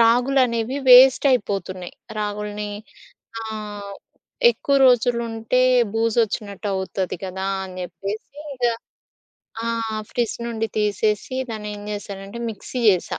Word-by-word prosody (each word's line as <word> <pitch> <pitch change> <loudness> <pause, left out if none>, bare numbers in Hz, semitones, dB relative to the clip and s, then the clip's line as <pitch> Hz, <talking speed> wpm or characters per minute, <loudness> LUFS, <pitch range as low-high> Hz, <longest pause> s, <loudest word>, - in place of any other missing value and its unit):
రాగులనేవి 245 +1 +3
waste 255 +2 +9
అయిపోతున్నాయి. 195 -6 -2 0.2
రాగులని 210 0 -3 0.7
ఆహ్, 210 -2 -6 0.6
ఎక్కువ 280 -11 -1
రోజులుంటే 235 -1 +2 0.3
బూజోచ్చినట్టు 220 -2 0
అవుతది 190 0 -2
గదా! 190 +1 -4 0.2
అని 185 -1 -9
జేప్పేసి 200 - -6
ఇగా 240 -2 +1 0.9
ఆహ్, 225 -2 -2
ఫ్రిడ్జ్ 235 -3 -1
నుండి 225 -1 -2
తీసేసి 210 +3 0
దాన్ని 210 -1 -5
ఏం 205 - -9
జేసానంటే 200 +1 -6
మిక్సీ 220 +4 -7
జేసా. 185 -4 +1
215 Hz, 100 wpm, -22 LUFS, 200-235 Hz, 0.9 s, waste